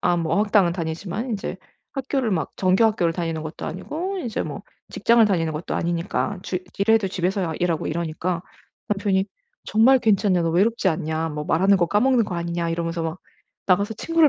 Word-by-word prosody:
아 175 - +2
뭐 165 -2 0
어학당은 205 -4 +3
다니지만 175 +7 -4
인제 195 -3 -3 0.4
학교를 270 -3 -1
막 160 -6 -1
정규 185 +4 +3
학교를 180 -7 +2
다니는 165 -2 -2
것도 155 0 -7
아니고 345 - -4
이제 235 -10 -2
뭐 - - -6 0.3
직장을 235 -1 +4
다니는 165 -6 +1
것도 155 +3 -4
아니니까 175 +3 -1
주 180 - -2 0.2
일해도 220 0 +3
집에서 180 -2 -1
일하고 170 -2 -1
이러니까 170 +2 -2 0.5
남편이 200 -2 +1 0.4
"정말 250 +5 +5
괜찮냐. 200 -5 +2
너 165 - +1
외롭지 200 +4 +2
않냐. 160 -1 -1
뭐 150 0 -4
말하는 190 +6 +4
거 175 - +3
까먹는 230 +5 +3
거 180 - -4
아니냐." 170 0 -2
이러면서 165 0 -2
막 165 +2 -3 0.5
나가서 200 +3 +2
친구를 330 +5 +3
185 Hz, 400 characters per minute, -23 LUFS, 165-215 Hz, 0.5 s, 정말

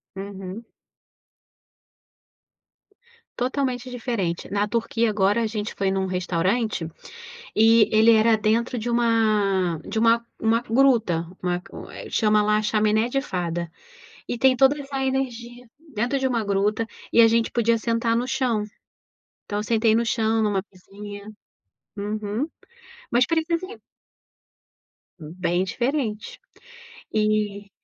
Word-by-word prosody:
Uhum. 195 +1 -7 2.7
Totalmente 255 0 -2
diferente. 230 -9 -3
Na 205 +1 +1
Turquia 230 +1 0
agora 205 +2 +2
a 225 - 0
gente 210 -1 -4
foi 195 - -2
em 190 0 +1
um 190 - 0
restaurante, 185 +1 -1 0.7
e 225 +1 +6
ele 220 +1 +6
era 220 0 +4
dentro 225 +3 0
de 225 +2 -4
uma 215 -7 +2
de 220 - -3
uma 230 +1 +3 0.2
uma 225 +1 +2
gruta, 225 -9 +2 0.2
uma 180 0 -1 0.5
chama 215 -1 +2
lá 210 +1 +2
chaminé 215 +2 +2
de 275 +2 0
fada. 175 - -3 0.6
E 240 - -2
tem 260 +2 +4
toda 270 +3 +4
essa 275 -1 -4
energia 245 -2 -3 0.2
dentro 240 +6 0
de 265 - -1
uma 245 -3 +1
gruta 205 +3 0 0.2
e - - +3
a 225 - +8
gente 230 0 +1
podia 230 -1 +2
sentar 230 0 0
no 240 +2 0
chão. 255 -5 0 0.8
Então 205 0 -3
eu - - -3
sentei 225 0 +2
no 230 +1 +2
chão 225 -1 +1
numa 205 -3 0
"mesinha" 205 +2 -10 0.7
Uhum. 210 +5 -3 0.6
Mas 240 +1 +4
precisa 335 +1 -1
ir - - -13 1.4
Bem 175 +3 -2
diferente, 245 - -2 0.7
e 210 -2 0
220 Hz, 125 wpm, -24 LUFS, 205-240 Hz, 2.7 s, a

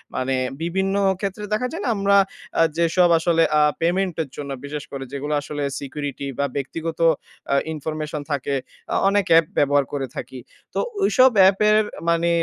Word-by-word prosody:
মানে 130 +1 0 0.3
বিভিন্ন 190 +3 -1 0.2
ক্ষেত্রে 200 +1 -4
দেখা 250 +4 0
যায় 335 - -5
না - - 0
আমরা 200 0 +4 0.4
আ - - +6 0.2
যেসব 170 +1 +3
আসলে 165 0 +3 0.2
আ - - +5 0.2
পেমেন্টের 170 -3 0
জন্য 140 -1 -5
বিশেষ 145 0 -5
করে 135 -1 -5
যেগুলো 145 +2 -3
আসলে 145 0 -5 0.2
সিকিউরিটি 140 0 -5
বা 140 - +2
ব্যক্তিগত 160 +4 -4 0.5
আ - - +4 0.2
ইনফরমেশন 155 0 -4
থাকে, 140 0 -1 0.4
আ - - +1
অনেক 200 -1 +2
অ্যাপ 165 0 +7
ব্যবহার 145 0 +3
করে 135 -2 -2
থাকি। 130 - -7 0.3
তো - - -1 0.2
ওইসব 260 -9 +6
অ্যাপের 205 +3 +5 0.3
মানে 170 0 +2
165 Hz, 160 wpm, -22 LUFS, 145-190 Hz, 0.5 s, অ্যাপ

